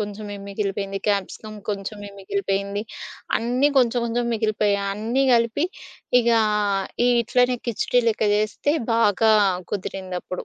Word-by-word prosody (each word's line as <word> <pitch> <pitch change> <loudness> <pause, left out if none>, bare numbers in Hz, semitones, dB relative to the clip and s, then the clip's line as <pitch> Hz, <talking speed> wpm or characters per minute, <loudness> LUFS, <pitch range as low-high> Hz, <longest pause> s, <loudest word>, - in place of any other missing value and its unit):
కొంచెమే 205 0 -5
మిగిలిపేంది, 195 -1 -3
క్యాప్సికం 205 +2 -2 0.2
కొంచెమే 205 0 -6
మిగిలిపేంది, 200 +1 -2 0.6
అన్నీ 250 +5 +1
కొంచెం 245 -1 +3
కొంచెం 235 +1 -1
మిగిలిపోయాయి. 210 -2 +1
అన్నీ 230 +6 0
గలిపి 235 +7 +1 0.5
ఇక 235 - 0 0.8
ఈ - - +4
ఇట్లనే 245 +2 +2
కిచిడీ 245 +2 +1
లెక్క 220 0 0
జేస్తే 215 +8 0 0.2
బాగా 220 -1 +3 0.4
కుదిరిందప్పుడు. 185 -2 -5
210 Hz, 110 wpm, -23 LUFS, 200-235 Hz, 0.8 s, ఈ